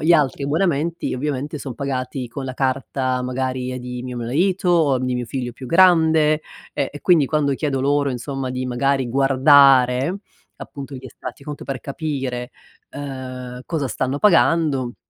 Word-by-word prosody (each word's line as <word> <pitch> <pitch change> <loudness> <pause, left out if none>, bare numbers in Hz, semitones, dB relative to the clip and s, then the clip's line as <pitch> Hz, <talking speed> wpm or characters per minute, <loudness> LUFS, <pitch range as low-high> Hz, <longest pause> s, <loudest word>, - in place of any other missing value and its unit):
gli 155 +3 +1
altri 145 -3 +2
abbonamenti, 165 +2 0
ovviamente, 145 +2 -3
son 130 -3 -7
pagati 130 -1 -3
con 135 +3 -7
la 130 - -4
carta 130 -1 -1
magari, 130 0 -2
ehm, 130 - -4
di 125 0 -6
mio 125 -1 -6
marito, 175 +11 0
o 155 -7 +3
m 130 - -3
di 125 - -1
mio 125 0 -2
figlio 125 0 -4
più 130 +2 -10
grande, 160 -2 +4 0.3
e - - -1
e 145 - -9
quindi 165 -6 +4
quando 145 -1 +1
chiedo 135 -2 -1
loro, 140 +1 +1
insomma, 130 +1 -4
di 130 0 -3
magari 130 +1 0
guardare, 135 +2 +5 0.4
appunto, 140 -1 -8
gli 130 - -11
estratti 125 +1 -9
conto 150 -1 -7
per 135 -2 -4
capire, 135 -4 -4 0.4
uhm, 130 -3 -7
cosa 155 -5 -2
stanno 130 +2 -2
pagando, 160 -9 +3
135 Hz, 165 wpm, -21 LUFS, 125-150 Hz, 0.4 s, guardare